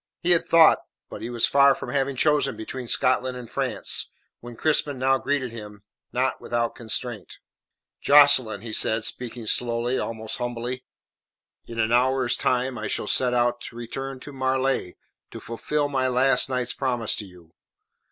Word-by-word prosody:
He 175 - +2
had 170 - +3
thought, 165 -1 +6 0.3
but - - -8
he 115 - -5
was 120 -1 +2
far 140 -1 +5
from - - -8
having 140 -1 -1
chosen 145 0 +1
between 125 +3 -7
Scotland 130 +1 +1
and 125 -2 -9
France, - - 0 0.3
when 120 0 -10
Crispin 150 0 +1
now 135 +1 +2
greeted 140 -4 -2
him, 105 -3 -10 0.3
not 130 +2 -1
without 120 -1 -1
constraint. 115 -2 -5 0.6
"Jocelyn," 140 -8 +5
he 115 -1 -7
said, 110 +1 +1
speaking 120 0 -3
slowly, 120 +3 0
almost 110 0 -4
humbly. 120 +1 -4 0.8
"In 115 -1 -7
an 110 0 +1
hour's 130 +1 +2
time 125 0 -1
I 105 - -4
shall - - -3
set 125 +3 +1
out 120 0 +1
to - - -9
return 135 +3 -6
to 145 - -10
Marleigh 130 -6 -1 0.4
to - - -9
fulfil 145 +5 -2
my 130 -2 0
last 130 +1 +3
night's 125 -1 -1
promise 120 -4 -1
to 105 - -5
you. 90 -3 -17
125 Hz, 160 wpm, -24 LUFS, 115-135 Hz, 0.8 s, thought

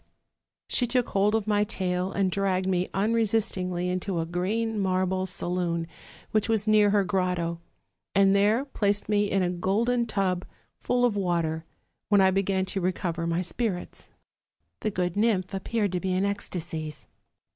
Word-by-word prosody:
She 245 - +1
took 245 0 +1
hold 205 +2 +2
of 220 -2 0
my 210 -1 +2
tail, 185 -3 -1
and 195 -1 0
dragged 190 -1 0
me 185 -1 0
unresistingly 200 -4 0
into 180 0 -2
a 165 - -1
green 210 +6 -1
marble 185 0 0
saloon, 175 -2 -1 0.5
which 215 0 +1
was 220 -2 +1
near 210 -1 +5
her 200 -1 +3
grotto; 180 -3 -1 0.5
and 195 0 +5
there 210 +6 +3
placed 205 -7 -1
me 205 -1 +2
in 195 -1 +1
a 175 - 0
golden 225 +7 +1
tub 185 -4 0 0.4
full 245 0 +1
of 235 -4 +1
water, 170 -4 -1 0.4
when 205 -1 +5
I 190 0 +5
began 190 0 +1
to 190 +1 -2
recover 175 -2 -1
my 170 +2 0
spirits. 180 +1 -4 0.7
The 215 - -1
good 180 -3 -2
nymph 205 -4 +1
appeared 205 +1 -1
to 180 - -1
be 185 0 -1
in 190 +2 +1
ecstasies. 165 -6 -4
190 Hz, 155 wpm, -27 LUFS, 180-210 Hz, 0.7 s, near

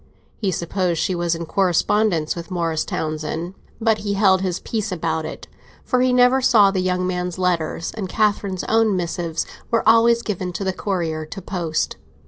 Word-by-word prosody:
He 205 - -1
supposed 175 -1 -1
she 170 +4 0
was 170 -1 0
in 165 0 -5
correspondence 180 -1 +1
with 170 -1 -7
Morris 165 -3 -1
Townsend; 160 +3 -3 0.3
but 220 -2 +2
he 205 -1 -2
held 190 -2 +4
his 185 -2 -1
peace 215 -3 -3
about 160 -2 -2
it, - - -8 0.4
for 250 - +1
he 255 0 +3
never 250 +1 +4
saw 210 -6 +5
the 190 - -1
young 180 0 0
man's 180 -1 -2
letters, 170 -3 -1
and 200 -4 -5
Catherine's 200 -3 0
own 220 -2 +2
missives 170 -2 -2 0.2
were 230 -2 +1
always 230 +1 +5
given 185 -3 -3
to 185 - -3
the 190 -1 -1
courier 170 -5 -2
to 195 - -7
post. 170 -4 -2
185 Hz, 175 wpm, -21 LUFS, 170-210 Hz, 0.4 s, saw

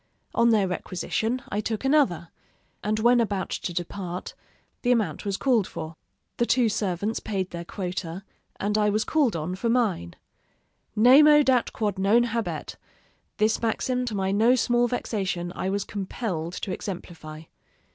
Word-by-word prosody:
On 235 - +4
their 210 -4 +3
requisition, 220 +7 -2
I 205 - -1
took 220 +3 -3
another; 195 - +2 0.5
and 215 +1 0
when 240 +2 +4
about 200 -4 -2
to - - -3
depart, 175 +1 -5 0.5
the 245 - +2
amount 210 -11 0
was 200 -1 -1
called 240 -8 +2
for. 160 0 -7 0.4
The 235 - +1
two 240 -2 +3
servants 205 +1 -1
paid 190 -3 -3
their 170 0 -5
quota, 180 -1 -5 0.4
and 210 +2 0
I 210 0 +3
was 215 +1 +1
called 285 - +1
on 165 +3 -3
for 210 +5 -2
mine. 210 - 0 0.8
Nemo 295 +6 +7
dat 255 -3 +2
quod 205 -3 -2
non 210 +5 +4
habet 230 -1 -3 0.6
this 215 +1 +2
maxim, 250 +2 0
to 225 -4 -3
my 190 -1 0
no 225 +5 +4
small 240 -1 +2
vexation, 190 -7 -2
I 185 - -2
was 200 0 -1
compelled 185 -4 -4
to 190 - -4
exemplify. 165 -5 -7
210 Hz, 155 wpm, -26 LUFS, 185-235 Hz, 0.8 s, Nemo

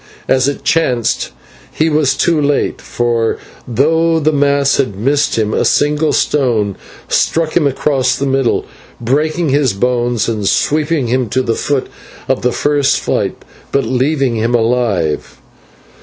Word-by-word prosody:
As 130 0 +2
it 140 - -3
chanced 125 -8 0 0.4
he 160 - 0
was 150 -3 +1
too 165 -3 +2
late, 145 0 0
for 115 -2 -1 0.3
though 160 +7 +2
the 155 0 +1
mass 140 -1 +2
had 130 -8 -1
missed 140 +4 +1
him, 110 -1 0
a - - +1
single 150 +1 +2
stone 115 -9 0 0.3
struck 160 -1 0
him 160 -5 +3
across 135 -1 0
the 140 - -2
middle, 135 -2 0 0.3
breaking 155 +7 0
his 135 -4 +2
bones 120 +1 0
and 110 -3 -2
sweeping 150 -1 0
him 125 0 -1
to 130 +4 0
the 115 - 0
foot 140 +2 -1 0.4
of 130 - 0
the 125 - +1
first 145 +1 +1
flight, - - -2 0.3
but 140 - +1
leaving 130 +1 0
him 115 +2 0
alive. 110 -10 0
135 Hz, 145 wpm, -15 LUFS, 120-150 Hz, 0.4 s, him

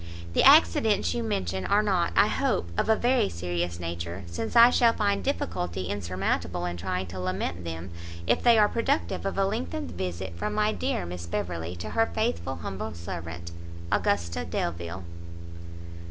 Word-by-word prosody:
The - - +4
accidents 200 - +5
you 240 - -1
mention 95 - -2
are 205 +1 +3
not, 185 -5 +1
I - - +6
hope, 85 - 0
of - - 0
a 220 - +6
very 245 - +2
serious 85 0 -3
nature, 85 +2 -5
since 85 +6 -5
I 235 +1 +9
shall 235 -2 +4
find 200 -2 0
difficulty 90 - -2
insurmountable 90 -2 -2
in 85 0 -3
trying 90 +1 -2
to 90 +1 -7
lament 90 -1 -3
them, 85 +2 -6 0.3
if - - +2
they 235 -2 +6
are 210 -1 +6
productive 150 - -1
of 195 - -3
a 195 - +3
lengthened 90 - -3
visit 90 0 -4
from 85 - -3
my 215 0 +2
dear 90 - -2
Miss 85 0 -6
Beverley 85 0 -3
to 85 - -6
her 225 0 +2
Faithful 220 - -1
humble 95 +1 -4
servant, 85 0 -6 0.4
AUGUSTA 85 -4 0
DELVILE. 85 +2 -3
90 Hz, 165 wpm, -27 LUFS, -, 0.4 s, I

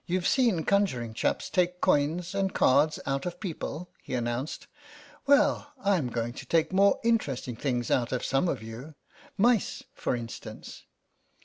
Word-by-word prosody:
"Youve 180 0 -1
seen 230 -11 +2
conjuring 130 - +1
chaps - - -1
take 180 -1 0
coins 165 +5 +1
and 195 -1 -1
cards 145 +4 +4
out 135 +3 -1
of 175 0 -6
people," 175 -2 -5
he - - -5
announced; 120 +4 -3 0.6
"well, 285 +1 +3
Fm 175 -11 +2
going 115 0 -2
to - - -9
take 165 +2 +2
more 200 +1 +4
interesting 145 - 0
things 120 -1 -2
out 120 -2 +1
of 125 - -2
some 135 +7 +1
of - - -3
you. 120 +7 -9 0.4
Mice, 230 0 +2
for - - -1
instance." 115 -1 -8
155 Hz, 150 wpm, -28 LUFS, 125-190 Hz, 0.6 s, cards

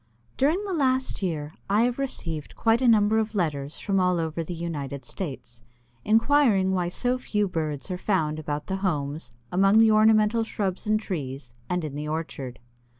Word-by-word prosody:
During 320 +10 +1
the 390 - -3
last 260 -6 +1
year 155 -5 -3 0.2
I 210 +3 +4
have 245 +2 0
received 165 - -4
quite 225 +2 +2
a 255 - +3
number 220 -1 +4
of 220 0 -2
letters 150 -6 -1
from 195 -1 0
all 180 -1 +2
over 160 0 -2
the 175 +2 -6
United 145 -5 -5
States, 130 -8 -7 0.4
inquiring 225 -4 +3
why 180 -2 0
so 250 +7 0
few 210 -5 0
birds 155 -3 -3
are 180 - -3
found 155 -7 0
about 150 -1 -4
the 190 - -2
homes, 150 -7 -2 0.2
among 195 +3 +4
the 225 0 +6
ornamental 215 +1 +4
shrubs 200 -3 -3
and 215 0 +3
trees, 135 - -5 0.2
and 180 -1 -1
in 150 -3 -4
the 150 +1 -4
orchard. 145 -5 -4
185 Hz, 175 wpm, -26 LUFS, 155-220 Hz, 0.4 s, the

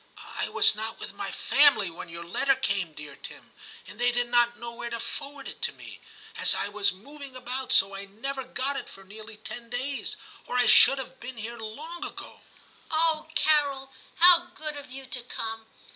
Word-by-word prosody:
' - - -30 0.2
I - - -1
was - - +4
not 220 +1 -5
with - - -8
my - - -5
family 280 - +5
when 170 +1 -9
your 170 +1 -7
letter 270 +11 +1
came, 195 -10 -1
dear 150 -2 -9
Tim, - - -11 0.3
and 210 - -13
they 245 0 +3
did 245 0 -1
not 240 0 +3
know 235 0 -7
where 235 0 -6
to 235 0 -4
forward 280 +3 -6
it - - -9
to - - 0
me, - - -12 0.4
as - - +6
I 200 - -2
was 205 0 +2
moving 275 +8 -11
about; 255 +1 -2
so 195 +1 +5
I 195 0 -5
never 265 +7 -5
got 265 +2 -2
it - - -4
for 195 - -13
nearly 215 +2 -9
ten 235 +2 -7
days, 260 +3 -2 0.3
or 250 - -2
I 245 - +4
should 275 - +8
have 260 0 -8
been 245 +1 -8
here 230 +2 -7
long 300 +11 -7
ago.' - - -9 0.3
' - - -29
Oh, 315 -1 +2
Carol! 280 -3 +2 0.2
how 350 0 +8
good 305 -1 -5
of 285 -2 -8
you 265 +1 -9
to 255 -1 -1
come. 225 -2 -6
245 Hz, 205 wpm, -27 LUFS, 215-275 Hz, 0.4 s, should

